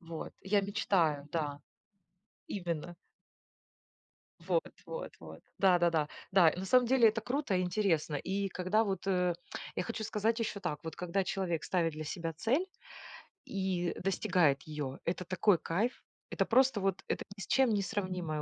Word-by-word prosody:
вот 165 -2 -7
я 200 +1 +3
мечтаю, 175 -7 +1
да, 145 -3 -2 0.9
именно. 175 -3 -4 1.5
Вот - - +1 0.2
вот - - -5
вот. - - -11 0.2
Да-да-да. 175 -5 +4 0.2
Да, 185 -3 +6
и 160 - -1
на 190 - -3
самом 250 +5 +4
деле 240 -2 +6
это 220 +1 -1
круто 255 -1 -1
и - - +2
интересно. 180 -5 +1
И 195 +7 -1
когда 185 +4 +1
вот, 195 -2 -3
э, 180 -2 +2 0.4
я - - +1
хочу 225 +2 -4
сказать 220 +2 0
ещё 215 -3 -2
так: 175 -6 -2
вот 160 -1 -5
когда 180 +2 -1
человек 180 -3 -1
ставит 170 -3 +1
для 155 +1 -6
себя 165 +1 -3
цель 240 - +1 0.8
и 185 -3 -1
достигает 170 -6 +2
её, 145 -3 -5
это 180 +2 -1
такой 185 +2 +3
кайф, 210 +9 -1 0.3
это - - 0
просто 255 -3 +4
вот 195 0 0
это - - -1
ни - - -7
с - - -6
чем 265 -2 +4
не 205 - +2
сравнимое 180 -6 -2
185 Hz, 160 wpm, -32 LUFS, 165-205 Hz, 1.5 s, Да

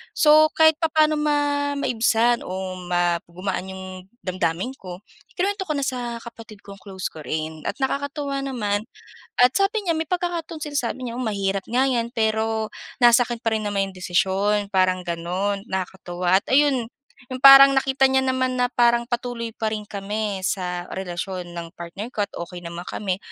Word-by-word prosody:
so 310 0 +6
kahit 315 -1 +5
papaano 310 -2 +2
ma 300 -1 +2 0.4
maibsan 235 -3 +2
o 185 0 -5
ma 175 -1 +1
gumaan 185 +2 -4
'yong 190 0 -8 0.4
damdamin 185 +4 -1
ko, 180 -1 -8 0.4
i-kinuwento 390 +1 -1
ko 305 - 0
na 280 - -1
sa 245 -3 -3
kapatid 225 -3 -12
kong 200 -1 -11
close 190 -2 -5
ko 160 - -11
rin 155 +1 -4
at - - -2
nakakatuwa 280 +1 -2
naman 210 -6 -1 0.6
at 250 0 +6
sabi 395 +2 +2
niya 335 -2 +1
may 320 0 -2
pagkakataon 345 -2 -2
sinasabi 260 -3 -3
niyang 240 +2 -4
mahirap 195 -3 -1
nga 260 +3 +3
'yan, 235 -3 -1
pero 220 -1 0 0.3
nasa 240 0 +6
akin 240 -1 -4
pa 225 -1 +1
rin 215 - -2
naman 200 -1 0
'yong 190 - -14
desisyon 190 +4 +1
parang 185 -1 +2
gano'n. 180 +4 -2
Nakakatuwa 185 -1 0
at - - -60
ayun 265 -4 +3 0.5
yung 255 - -6
parang 275 0 +10
nakita 270 0 +2
niya 265 0 +3
naman 260 -1 0
na 245 - +2
parang 235 -1 +2
patuloy 240 -1 -3
pa 220 -1 -2
rin 210 -1 -6
kami 205 0 -3
sa 180 -3 -2
relasyon 180 -1 -5
ng 170 -1 -8
partner 195 +8 -8
ko 210 - -1
at 200 - -1
okey 175 +1 -7
naman 170 +1 -7
kami, 190 -3 -3
220 Hz, 170 wpm, -23 LUFS, 190-265 Hz, 0.6 s, parang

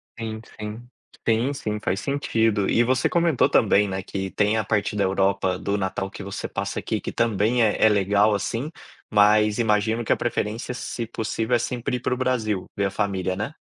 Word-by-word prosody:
Sim, 110 -1 -5 0.2
sim 110 +3 -7 0.4
sim, 115 +5 +2
sim, 105 -6 -3
faz 95 0 -1
sentido 115 -7 0
e 120 - +4
você 125 +2 +1
comentou 170 -5 +2
também, 105 0 +4
né, 95 0 -3
que 95 0 -4
tem 105 +2 +1
a 110 - +1
parte 105 0 0
da 100 - +1
Europa, 95 -1 +1
do 100 0 -1
Natal 95 0 -2
que 100 - -9
você 100 0 -5
passa - - -3
aqui - - -3
que - - -4
também 115 +1 +1
é 105 - +2
é 110 - +7
legal, 100 +1 +3
assim, 115 +8 -2 0.4
mas 105 0 +4
imagino 110 +1 +1
que - - +3
a - - 0
preferência, 115 +1 -2
se 120 -1 -4
possível, 110 +2 -1
é - - +2
sempre 125 +1 -2
ir - - -7
pro 125 - -1
Brasil, 115 -6 -1
ver 100 - +1
a 100 - -1
família, 95 -2 -1
né? 105 +9 -4
105 Hz, 195 wpm, -24 LUFS, 100-115 Hz, 0.4 s, é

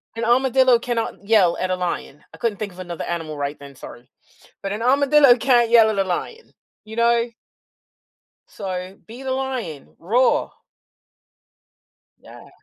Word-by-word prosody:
an 230 0 -3
armadillo 255 +1 +4
cannot 230 -4 -4
yell 200 -6 +4
at 185 - -2
a - - +1
lion. 175 -5 -5
I - - -12
couldn't 220 -4 -2
think 205 -3 -5
of 180 - -15
another 175 -2 -6
animal 165 -3 -5
right 145 +1 -4
then, 140 -1 -12
sorry, 125 0 -12 0.5
but 195 - -3
an 210 +2 -4
armadillo 275 0 +5
can't 240 -2 +2
yell 225 -2 +6
at 210 - -3
a 195 - +2
lion, 450 - -5 0.3
you 220 +1 -10
know. 235 0 +2 1.2
So, 185 -1 -6
be 235 +4 -11
the 265 - -3
lion, 255 - -5
roar. 240 +9 +1 1.7
Yeah. - - -15
220 Hz, 150 wpm, -21 LUFS, 180-245 Hz, 1.7 s, yell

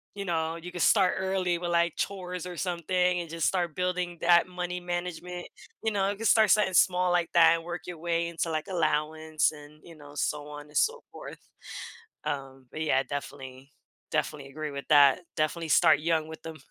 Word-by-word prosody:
you 200 -1 -5
know, 165 -2 -1
you 175 +2 -8
could 175 - -5
start 190 -1 +4
early 190 -2 0
with, 175 0 -3
like, 170 -1 +2
chores 180 -2 -4
or 180 -2 -7
something 180 +1 0
and 170 - -8
just 165 0 -1
start 175 -4 -1
building 180 -1 -2
that 170 0 +5
money 180 0 -4
management, 175 0 -5 0.4
you 220 - +1
know, 195 -1 +1
it 200 - -3
could 225 +2 -1
start 220 -2 +5
something 205 -3 +3
small 180 0 +4
like 175 -1 +1
that 165 -1 +7
and 165 - -5
work 175 +1 -5
your 175 -3 -7
way 170 0 0
into, 170 0 -2
like, 155 -1 -2
allowance 155 -3 0
and, 150 0 -14
you 170 - -13
know, 145 -1 -13
so 150 0 -2
on 150 0 -9
and 150 - -5
so 465 +1 +2
forth. - - -9 0.9
Um, 135 -2 -5
but, 155 - -5
yeah, 135 -4 +2
definitely 135 -2 -7 0.4
definitely 145 -3 -2
agree 155 +2 -5
with 140 -1 -6
that, 140 +1 +6 0.2
definitely 160 +1 -1
start 160 -1 +6
young 160 -1 0
with 160 - -10
'em, 160 -1 -7
170 Hz, 200 wpm, -28 LUFS, 155-180 Hz, 0.9 s, that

